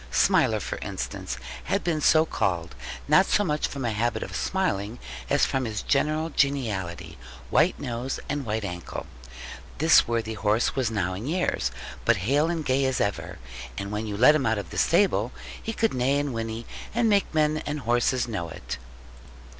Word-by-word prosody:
Smiler, 60 - +3
for - - -4
instance, - - -4 0.3
had - - 0
been 165 -3 0
so 155 +2 +5
called, 85 - -1 0.3
not 170 +7 +5
so 205 - +3
much 150 -5 0
from 135 -3 -5
a 115 - +1
habit 115 +3 0
of - - -7
smiling, 115 - -1 0.3
as - - +4
from 135 -1 -1
his 110 -2 -3
general 155 +3 +1
geniality, 110 -13 -1 0.3
white - - +3
nose, 120 +2 -3
and 145 -1 -2
white 110 -2 -2
ankle. 90 -2 -5 0.7
This 160 +4 +6
worthy 115 -1 -1
horse 110 +2 +1
was 130 -4 +1
now 95 -5 -1
in 105 +7 -5
years, 165 - 0 0.3
but 115 -2 +4
hale 145 +6 +3
and 165 -3 -2
gay 130 +1 +2
as 130 -1 0
ever; 100 -1 -2 0.4
and 100 +1 -4
when 105 +1 -2
you 100 -1 -3
let 130 +7 +7
him 145 -5 +1
out 110 0 +2
of 100 -4 -6
the - - -6
stable, 165 - +3 0.3
he 225 - -3
could 225 0 0
neigh 130 +2 +2
and 145 -2 -1
whinny, 115 0 -4 0.3
and 235 -1 +3
make 205 -2 +2
men 155 -1 +2
and 150 0 -2
horses 120 +1 +1
know 100 -8 -3
it. 65 - -6
125 Hz, 180 wpm, -26 LUFS, 105-150 Hz, 0.7 s, let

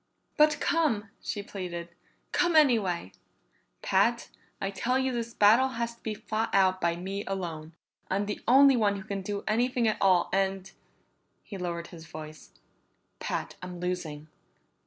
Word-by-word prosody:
"But 300 0 +4
come," 225 -11 +1
she 205 - -4
pleaded. 175 -4 -6 0.4
"Come 350 -2 +2
anyway!" 215 - +3 0.7
"Pat, - - +2 0.3
I 195 - -2
tell 235 +6 0
you 265 0 0
this 235 -1 -4
battle 225 +6 +6
has 235 0 -2
to 235 - -26
be 215 -1 -3
fought 220 +1 -2
out 185 -1 +3
by 170 0 +1
me 195 +3 -4
alone. 170 -5 -5 0.4
I'm 200 +2 0
the 205 - -4
only 270 +2 +7
one 210 -4 +2
who 195 - -6
can 200 -1 -4
do 200 +1 -4
anything 240 +2 +1
at 215 - 0
all 185 -3 +4
and," 195 0 0 0.7
he 205 - -9
lowered 170 -1 -4
his 160 -2 -11
voice, 155 - -10 0.7
"Pat, - - -4
I'm 180 -1 -7
losing!" 175 -4 -4
200 Hz, 155 wpm, -28 LUFS, 180-230 Hz, 0.7 s, only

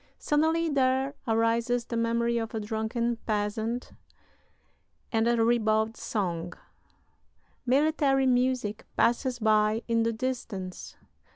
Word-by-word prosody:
Suddenly 320 +3 +1
there 265 -1 +1
arises 230 +2 +1
the 235 - -5
memory 235 0 +1
of 225 0 -5
a - - -1
drunken 220 +2 -2
peasant 220 +3 -2 1.2
and 225 0 +2
a 235 -1 +3
ribald 220 -1 +2
song.... 180 -7 -3 1.1
Military 275 0 +3
music 250 -4 +1
passes 245 +1 +2
by 215 0 +2
in 230 -1 +2
the 230 0 +1
distance. 225 -6 -5
230 Hz, 105 wpm, -28 LUFS, 220-255 Hz, 1.2 s, a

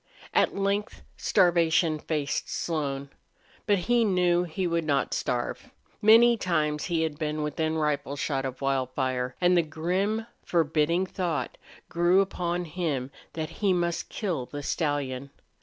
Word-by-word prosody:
At - - +3
length 200 +1 -1
starvation 165 -2 +3
faced 150 -3 -2
Slone. 140 -4 -2 0.6
But 205 -1 +4
he 240 0 +3
knew 180 -3 +2
he 180 +3 -3
would 170 -1 0
not 140 -3 0
starve. 120 -1 -2 0.3
Many 230 +2 +7
times 150 -6 0
he 165 -2 0
had 155 -2 -3
been 155 -1 -2
within 160 +2 -1
rifle 145 -2 -1
shot 140 -1 -1
of 130 0 -5
Wildfire. 130 -1 -1
And 180 0 +4
the 175 - +5
grim, 185 +8 -1 0.2
forbidding 165 +2 +1
thought 170 -9 -2 0.3
grew 175 +2 +3
upon 175 -2 -2
him 150 -6 -2 0.2
that 155 -1 -4
he 200 -3 +3
must 170 -1 -1
kill 165 - -3
the 145 0 -7
stallion. 140 -4 -2
160 Hz, 140 wpm, -27 LUFS, 145-180 Hz, 0.6 s, Many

